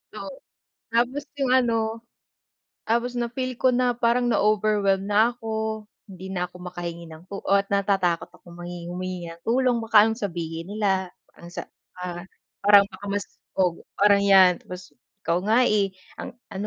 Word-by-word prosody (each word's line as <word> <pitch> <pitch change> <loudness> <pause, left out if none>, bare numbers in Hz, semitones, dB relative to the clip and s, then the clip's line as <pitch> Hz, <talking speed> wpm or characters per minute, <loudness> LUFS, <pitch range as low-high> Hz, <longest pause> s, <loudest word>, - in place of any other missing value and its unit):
Oo, - - -7 0.6
tapos 245 +5 0
'yong 270 -3 0
ano, 230 -3 +1 0.9
tapos 235 +2 +1
na-feel 245 +2 -3
ko 260 - +4
na 250 0 +2
parang 240 +1 +1
na-overwhelmed 205 -2 +2
na 220 +4 +2
ako. 220 -1 -3 0.2
Hindi 190 -1 -10
na 180 -2 -2
ako 180 - -15
makahingi 170 -1 -6
ng 160 +1 -12
tu 200 - -6
ah, 200 +1 +4
natatakot 195 -4 +1
akong 175 -1 -15
manghingi 175 0 -7
humingi 180 -1 -5
ng 165 0 -12
tulong. 245 0 +2
Baka 215 -2 +6
anong 225 0 -1
sabihin 170 -2 -5
nila. 190 -3 0 0.2
Ang 170 - -12
sa - - -6 0.3
ah, 175 -1 -5 0.4
parang 205 -1 +8
baka 205 - -12
mas, 205 0 -2 0.3
oh, 180 -2 0 0.2
parang 200 0 +6
'yan 190 -3 +6
tapos, 180 0 -10 0.3
"Ikaw 170 +1 +1
nga, 220 +3 +3
eh, 200 -2 +1 0.2
ang - - -7 0.2
ano 195 +2 -4
200 Hz, 160 wpm, -24 LUFS, 180-230 Hz, 0.9 s, parang